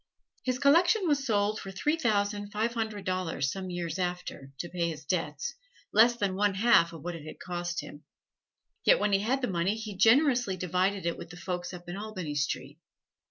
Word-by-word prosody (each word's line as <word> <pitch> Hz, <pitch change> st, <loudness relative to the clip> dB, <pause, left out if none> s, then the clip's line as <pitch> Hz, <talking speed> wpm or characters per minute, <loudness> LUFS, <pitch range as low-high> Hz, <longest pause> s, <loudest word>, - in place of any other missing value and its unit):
His 255 Hz, -1 st, -1 dB
collection 345 Hz, -, +4 dB
was 285 Hz, -3 st, +2 dB
sold 210 Hz, -1 st, +1 dB
for 195 Hz, -, -7 dB
three 295 Hz, +11 st, 0 dB
thousand 205 Hz, -6 st, 0 dB
five 220 Hz, +3 st, 0 dB
hundred 220 Hz, -3 st, -3 dB
dollars 180 Hz, -7 st, -1 dB
some 190 Hz, -1 st, -5 dB
years 175 Hz, -1 st, -3 dB
after 180 Hz, -6 st, -4 dB
to 175 Hz, -, -4 dB
pay 170 Hz, -2 st, -1 dB
his 155 Hz, -2 st, -7 dB
debts 150 Hz, -3 st, -2 dB, 0.4 s
less 235 Hz, +2 st, +6 dB
than 200 Hz, -5 st, -1 dB
one 200 Hz, 0 st, +1 dB
half 200 Hz, -5 st, +5 dB
of 165 Hz, -3 st, -10 dB
what 175 Hz, +1 st, -3 dB
it 160 Hz, -, -9 dB
had 155 Hz, -, -9 dB
cost 175 Hz, -1 st, -3 dB
him. 145 Hz, -, -11 dB, 0.8 s
Yet -, -, +6 dB
when 205 Hz, -, +1 dB
he 195 Hz, -, +5 dB
had 250 Hz, +5 st, 0 dB
money 185 Hz, +2 st, 0 dB
he 220 Hz, -2 st, -6 dB
generously 240 Hz, -1 st, +4 dB
divided 185 Hz, +2 st, 0 dB
it 170 Hz, -, -1 dB
with 170 Hz, -1 st, -8 dB
the 175 Hz, -, -10 dB
folks 180 Hz, -1 st, -4 dB
up 175 Hz, -1 st, -10 dB
in 175 Hz, +2 st, -5 dB
Albany 200 Hz, -7 st, -5 dB
Street. 145 Hz, 0 st, -2 dB
190 Hz, 195 wpm, -29 LUFS, 175-220 Hz, 0.8 s, less